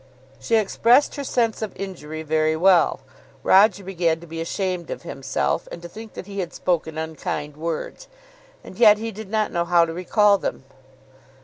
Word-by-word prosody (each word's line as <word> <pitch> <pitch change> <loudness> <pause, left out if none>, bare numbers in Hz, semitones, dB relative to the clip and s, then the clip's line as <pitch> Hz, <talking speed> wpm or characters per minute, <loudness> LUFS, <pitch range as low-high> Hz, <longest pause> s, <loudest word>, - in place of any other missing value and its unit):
"] 135 +1 -28
She 230 - 0
expressed 230 +5 +3
her 285 - -4
sense 230 -4 0
of 215 -3 -4
injury 160 -5 -6
very 155 0 +1
well. 180 +1 +4 0.4
Roger 200 0 +5
began 175 -3 0
to 170 - -12
be 165 0 -6
ashamed 180 0 -3
of - - -6
himself, 135 0 -2
and - - -7
to - - -6
think 220 +4 -11
that - - -7
he 200 0 -7
had 175 -2 -4
spoken 160 -3 -1
unkind 155 -2 -4
words. 165 - -5 0.6
And 185 - -12
yet 215 -3 +7
he 225 +1 -4
did 215 -1 -9
not 215 0 0
know 170 -1 0
how 170 0 +4
to 165 - -6
recall 200 +3 +3
them. - - -4
180 Hz, 185 wpm, -23 LUFS, 160-210 Hz, 0.6 s, yet